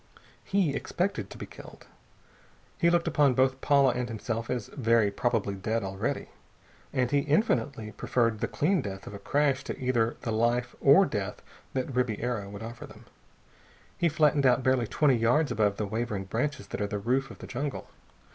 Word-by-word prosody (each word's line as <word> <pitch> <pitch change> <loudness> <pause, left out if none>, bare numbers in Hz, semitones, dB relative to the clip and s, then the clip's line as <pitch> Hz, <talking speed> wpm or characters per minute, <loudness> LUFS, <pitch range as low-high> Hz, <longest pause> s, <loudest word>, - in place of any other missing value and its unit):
He 190 -7 +1
expected 185 +7 -2
to - - -10
be - - -6
killed. - - -13 0.9
He 170 - +4
looked 170 0 +2
upon 140 -4 +3
both 130 +1 +2
Paula 140 -2 +4
and 125 0 -3
himself 115 +1 -4
as 125 -4 -2
very 115 -5 +2
probably 110 -2 0
dead 110 +4 -2
already. 95 0 -3 0.6
And 125 -2 0
he 145 - +4
infinitely 140 - 0
preferred 115 -2 0
the 115 - -1
clean 175 +3 +1
death 100 -3 -6
of - - -8
a 100 - -7
crash 140 +1 +1
to - - -5
either 120 -3 +1
the 115 - -3
life 120 +2 +1
or 145 +8 +7
death 105 - -4 0.3
that 130 +1 -2
Ribiera 120 -3 -1
would 100 +2 -8
offer 120 +1 -8
them. - - -15 0.9
He 170 - +2
flattened 150 -2 +3
out 125 0 +3
barely 130 -3 +2
twenty 140 -1 +3
yards 125 +7 +2
above 105 -2 +1
the 105 - -1
waving 110 -1 -3
branches 120 +10 -2
that - - -4
are 100 - 0
the 105 - -3
roof 130 +6 0
of - - -11
the - - -9
jungle. 140 +2 -4
125 Hz, 180 wpm, -28 LUFS, 110-140 Hz, 0.9 s, or